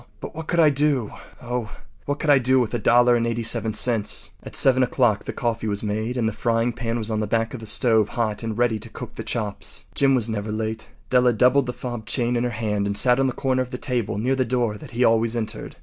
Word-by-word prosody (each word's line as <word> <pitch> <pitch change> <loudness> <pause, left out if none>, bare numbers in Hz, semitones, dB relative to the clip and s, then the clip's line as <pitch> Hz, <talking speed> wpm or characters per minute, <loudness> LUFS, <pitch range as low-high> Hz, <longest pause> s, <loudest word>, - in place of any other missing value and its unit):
But - - -8
what 160 0 -7
could 170 - 0
I 155 -3 +6
do—oh! 125 -4 -2 0.3
what 145 +1 -2
could 150 -1 +1
I 140 - +6
do 130 +1 +3
with 120 -2 -1
a 120 - 0
dollar 120 +3 +4
and 115 0 0
eighty 115 0 -2
seven 110 -1 +1
cents?” 115 -4 +1
At - - -10
7 130 -1 +5
o’clock 120 -4 +1
the - - -3
coffee 115 -2 -2
was 100 0 -3
made 110 +4 -2
and 115 -2 +1
the 110 - -2
frying 115 +2 0
pan 115 -1 -3
was 115 -1 -3
on 110 - 0
the 105 - -2
back 115 +1 0
of 130 - -6
the 110 - -8
stove 110 -1 +2
hot 110 -4 -2
and 115 -2 -4
ready 120 -3 +1
to - - -9
cook - - -9
the - - -7
chops. 105 -4 -4
Jim 135 -1 +3
was 120 -3 +1
never 105 -1 -3
late. 110 +1 -4 0.2
Della 125 -1 +4
doubled 125 +3 +3
the - - -1
fob 120 -3 -7
chain 120 0 0
in 120 - 0
her 125 - 0
hand 105 -3 -2
and 100 0 -2
sat 125 0 +4
on 135 - +3
the - - 0
corner 130 0 0
of 125 - -4
the 125 - -5
table 125 -7 -2
near 125 +5 0
the 130 - +1
door 120 -3 -1
that 105 - -11
he 120 +1 0
always 115 0 +2
entered. 110 -1 -5
120 Hz, 260 wpm, -23 LUFS, 110-125 Hz, 0.3 s, I